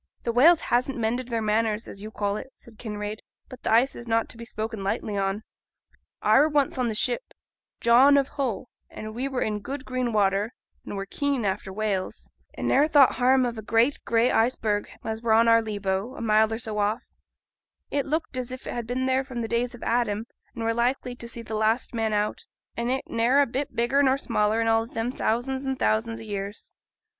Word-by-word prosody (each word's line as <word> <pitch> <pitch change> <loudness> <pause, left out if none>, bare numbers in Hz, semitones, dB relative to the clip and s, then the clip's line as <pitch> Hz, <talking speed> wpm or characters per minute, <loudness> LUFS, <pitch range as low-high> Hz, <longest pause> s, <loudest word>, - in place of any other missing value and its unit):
'Th' 235 - -1
whales 315 +7 +6
hasn't 255 +2 0
mended 235 +2 -1
their 230 -2 -2
manners, 215 0 0
as 195 - -9
you 215 - -6
call 205 -2 -2
it,' 265 - -7
said 225 -2 -17
Kinraid; 210 -1 -5 0.3
'but 255 - -11
th' - - -6
ice 235 +5 +4
is 235 - -9
not 225 0 +1
to - - -9
be 235 - -8
spoken 220 -2 -5
lightly 205 +1 -2
on. 195 +2 -1 0.8
I - - +5
were 300 +2 +4
once 290 -3 +1
in 245 -2 +1
th' 215 - -2
ship - - +1 0.6
John 260 +5 +6
of 275 -1 +2
Hull, 250 -6 -3 0.2
and 215 0 -8
we 250 +4 -2
were 265 -2 -1
in 210 -1 -2
good 270 +6 -6
green 255 -2 -1
water, 205 +1 +1 0.3
and - - -6
were 195 - -3
keen 280 +1 -1
after 190 0 -2
whales; 200 -2 -3 0.2
and - - -3
ne'er 285 +3 +4
thought 290 -4 +6
harm 255 +1 +3
of 235 -2 -3
a - - -5
great 230 +6 +2
gray 230 +1 +2
iceberg 220 -3 +1
as 220 0 -4
were 230 -1 +2
on 230 +1 +5
our 230 0 +6
lee 215 -2 -4
bow, 195 +5 -2
a - - -7
mile 220 -1 +3
or 225 - -1
so 220 -2 -4
off; 210 +4 0 0.9
it 285 0 -1
looked 310 -2 -2
as 250 0 -3
if 255 0 -7
it - - -4
had 240 -2 -4
been 255 +2 -1
there 260 +1 +2
from 255 -3 -5
the - - -2
days 235 +1 -1
of 240 - -11
Adam, 225 -2 0 0.3
and 230 - -4
were 225 0 +1
likely 245 +2 0
to 235 -1 -8
see 235 0 -8
th' 220 - -11
last 220 +4 +1
man 225 -1 0
out, 210 0 -1 0.3
and 235 +1 -2
it 265 +1 0
ne'er 235 +4 +2
a 285 - +5
bit 270 +3 -4
bigger 240 +4 +2
nor 265 -1 +3
smaller 220 -5 +1
in 225 - +1
all 225 0 +2
them 230 +1 -3
thousands 260 +3 -1
and 265 -1 -2
thousands 225 0 0
o' - - -8
years. 200 -1 -6
230 Hz, 225 wpm, -26 LUFS, 215-255 Hz, 0.9 s, whales